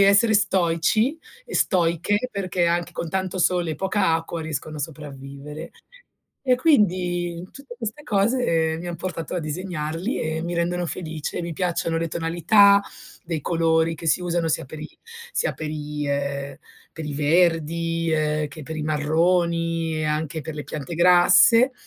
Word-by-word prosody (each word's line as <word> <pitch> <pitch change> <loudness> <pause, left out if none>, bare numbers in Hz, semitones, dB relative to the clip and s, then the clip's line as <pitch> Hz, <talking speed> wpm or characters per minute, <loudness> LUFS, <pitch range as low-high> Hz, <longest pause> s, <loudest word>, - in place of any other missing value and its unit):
essere 200 +3 +5
stoici 195 - +2 0.3
e - - -2
stoiche 185 +6 +1
perché 185 -4 -1
anche 170 0 0
con 170 - -4
tanto 185 +2 -2
sole 175 -2 +2
e - - -4
poca 190 -1 +1
acqua 165 +1 -3
riescono 155 -1 -4
a - - -6
sopravvivere. 145 +1 -7 0.7
E 255 -2 +3
quindi, 180 - +1
tutte 275 -3 -10
queste 230 +4 -5
cose 195 - +1
mi 175 - -7
han 175 -1 -4
portato 170 -1 -4
a - - 0
disegnarli 165 - -3
e 160 0 -2
mi 175 +1 -3
rendono 175 +1 -1
felice. 160 -1 -3
Mi 170 - -4
piacciono 165 -1 -1
le 165 0 -2
tonalità 175 +5 +4 0.4
dei 165 -4 -3
colori 165 -1 +1
che 165 +1 -8
si 180 - +3
usano 175 -1 -1
sia 155 - 0
per 150 +3 -10
i 155 - -7 0.4
sia - - 0
per 155 - -6
i, 150 -1 -4
ehm, 140 -1 -3 0.4
per 160 - -7
i 150 - -4
verdi, 165 +2 +1
ehm, 155 -1 0
che 150 +2 -10
per 160 +3 -6
i 155 - -3
marroni 165 +2 +1
e 155 - -2
anche 155 +1 -2
per 155 +2 -6
le 150 - -6
piante 150 +2 -6
grasse 180 +8 +6
165 Hz, 160 wpm, -23 LUFS, 155-180 Hz, 0.7 s, grasse